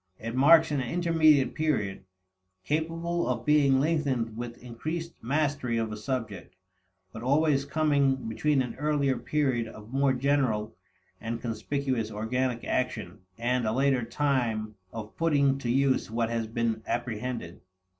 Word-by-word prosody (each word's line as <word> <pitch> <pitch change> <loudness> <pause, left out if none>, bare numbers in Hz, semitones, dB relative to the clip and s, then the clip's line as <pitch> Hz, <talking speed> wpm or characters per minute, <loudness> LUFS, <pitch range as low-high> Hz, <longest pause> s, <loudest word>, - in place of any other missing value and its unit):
It 115 +1 -5
marks 160 +5 +6
an 145 -2 0
intermediate 155 0 +3
period, 105 -12 -1 0.6
capable 165 - -1
of 120 -2 -2
being 145 -3 +4
lengthened 135 -7 0
with 120 0 -6
increased 155 +8 -5
mastery 140 -2 0
of 110 -1 -1
a - - -4
subject, 105 -6 -4 0.6
but 110 - -7
always 140 +2 +2
coming 145 -2 +2
between 135 +5 +1
an 125 - -5
earlier 145 -2 +1
period 130 -6 0
of 110 +2 -12
more 135 0 +3
general 125 -5 0 0.5
and 115 +1 -3
conspicuous 120 +1 -2
organic 120 +3 -2
action 110 -8 -2 0.2
and 120 0 0
a - - +1
later 135 +1 +2
time 115 -4 -1 0.2
of 110 -1 -8
putting 140 -4 +2
to 120 - -3
use 135 0 +2
what 115 +1 -1
has 115 -1 -1
been 115 0 -1
apprehended. 120 -6 -3
130 Hz, 135 wpm, -28 LUFS, 115-145 Hz, 0.6 s, marks